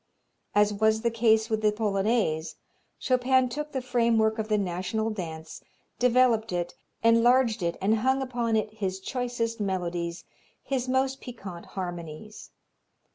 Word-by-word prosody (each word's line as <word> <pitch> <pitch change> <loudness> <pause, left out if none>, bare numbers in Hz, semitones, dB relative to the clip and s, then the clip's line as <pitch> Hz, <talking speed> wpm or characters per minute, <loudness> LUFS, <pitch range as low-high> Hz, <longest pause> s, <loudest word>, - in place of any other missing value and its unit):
As 210 0 +4
was 220 +1 +2
the 235 0 +1
case 220 -1 +3
with 220 -1 -1
the 210 -1 +3
Polonaise, 205 -6 0 0.4
Chopin 255 0 +2
took 300 +4 -5
the 265 -2 -3
framework 230 -3 +2
of 215 - -2
the 215 -1 +2
national 195 +4 -2
dance, 160 -6 -7 0.4
developed 245 -3 +3
it, 175 -1 -2 0.3
enlarged 230 0 +4
it 170 -1 -1
and 210 +4 +2
hung 260 +4 +2
upon 240 -4 -1
it 215 -1 -1
his 190 -3 -3
choicest 240 +1 -3
melodies, 175 -3 -2 0.4
his 260 -2 -2
most 265 +1 0
piquant 195 -9 -9
harmonies. 175 +2 -6
220 Hz, 135 wpm, -27 LUFS, 190-245 Hz, 0.4 s, As